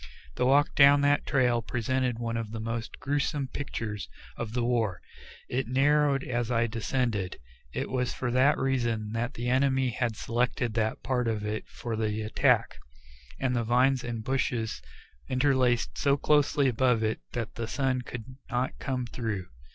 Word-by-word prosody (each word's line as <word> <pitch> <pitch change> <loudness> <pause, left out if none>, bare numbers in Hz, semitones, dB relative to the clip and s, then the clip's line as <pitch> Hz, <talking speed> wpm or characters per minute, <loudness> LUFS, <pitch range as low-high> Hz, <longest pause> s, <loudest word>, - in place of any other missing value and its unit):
The 125 - +1
walk 145 +2 +4
down 140 0 +7
that 145 0 +2
trail 125 -4 +2
presented 125 +1 -1
one 115 -1 -3
of 115 -2 -3
the 110 +1 -5
most 115 +1 -4
grewsome 145 0 -1
pictures 115 -8 -4 0.3
of 115 -2 -5
the 125 -1 0
war. 115 -7 0 0.5
It 130 0 -1
narrowed 140 +2 +3
as 120 -2 -2
it 115 -1 +1
descended; 115 -5 -1 0.3
it - - -3
was 125 -1 -1
for 120 -2 -3
that 130 +4 +4
reason 120 -5 0
the 120 +1 -2
enemy 130 0 +2
had 115 -1 -1
selected 120 +1 -1
that 110 -1 -1
part 125 0 0
of 110 -2 -1
it 105 +1 -3
for 115 -2 -5
the 110 0 -1
attack, 110 - +2 0.6
and 130 -2 0
the 120 - +1
vines 125 +3 +3
and 115 -2 -4
bushes 120 -3 -1 0.5
interlaced 130 -2 +2
so 140 -1 +3
closely 145 -1 +3
above 125 -2 +2
it 110 0 0
that 115 -3 -3
the 115 -1 -4
sun 130 0 0
could 125 +1 -8
not 125 +1 -2
come 130 -2 -2
through. 110 -6 -4
125 Hz, 160 wpm, -28 LUFS, 115-130 Hz, 0.6 s, down